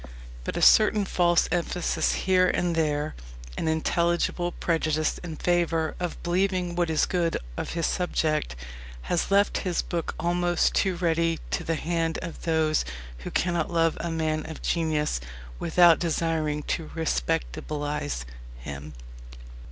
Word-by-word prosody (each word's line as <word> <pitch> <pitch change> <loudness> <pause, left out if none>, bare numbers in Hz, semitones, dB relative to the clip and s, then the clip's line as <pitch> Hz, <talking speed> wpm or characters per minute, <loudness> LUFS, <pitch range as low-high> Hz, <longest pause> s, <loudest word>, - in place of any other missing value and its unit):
But - - -3
a - - 0
certain 215 -1 +6
false 175 -2 +3
emphasis 175 0 0
here 185 -1 +4
and 175 -1 +1
there, 150 -1 0 0.4
an - - -2
intelligible 170 +2 +1
prejudice 155 -3 0
in 170 -3 -6
favour 165 -2 +1
of 175 -2 -4
believing 180 0 0
what 175 -1 +1
is 160 -1 +2
good 175 -2 0 0.2
of - - -4
his 165 -1 0
subject, 155 - 0 0.6
has 175 - +1
left 200 +1 +3
his 180 -3 -1
book 170 -2 -3
almost 175 0 +1
too 190 -2 +2
ready 165 -1 +1
to - - -1
the 165 - -1
hand 165 0 -1
of 170 - -7
those 160 -2 +1 0.4
who - - -6
cannot 175 -3 0
love 165 -1 +2
a 170 - -3
man 155 -1 -1
of 160 - -8
genius 155 - 0 0.4
without 170 0 +5
desiring 160 -3 0
to 160 +1 -3
"respectabilize" 70 - -2 0.3
him. 70 +4 -8
165 Hz, 135 wpm, -26 LUFS, 155-175 Hz, 0.6 s, certain